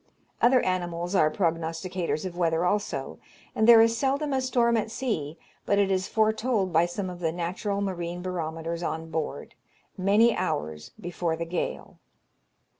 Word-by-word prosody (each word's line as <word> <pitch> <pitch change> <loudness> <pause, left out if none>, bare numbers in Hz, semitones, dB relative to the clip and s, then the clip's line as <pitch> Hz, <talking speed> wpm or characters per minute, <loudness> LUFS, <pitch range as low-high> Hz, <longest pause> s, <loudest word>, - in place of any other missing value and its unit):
Other 250 +1 +5
animals 175 -1 -2
are 155 -5 +4
prognosticators 165 +1 -2
of 180 -2 -5
weather 170 -1 +1
also; 180 -9 -2 0.4
and 220 - +2
there 230 -1 +9
is 230 0 +2
seldom 280 +3 0
a 265 - +1
storm 240 -2 +2
at 225 -1 0
sea, 190 - -3 0.3
but 200 - +1
it 200 -1 +3
is 190 0 0
foretold 220 -3 +1
by 165 +2 +4
some 185 +2 -4
of 180 -1 -7
the 165 -2 0
natural 185 +4 -2
marine 175 -2 -3
barometers 165 -2 -4
on 160 -1 -4
board, 160 -1 -4 0.5
many 210 +5 +4
hours 75 - -3
before 175 -1 -2
the 170 +1 -4
gale. 170 +1 -4
180 Hz, 155 wpm, -27 LUFS, 165-215 Hz, 0.5 s, there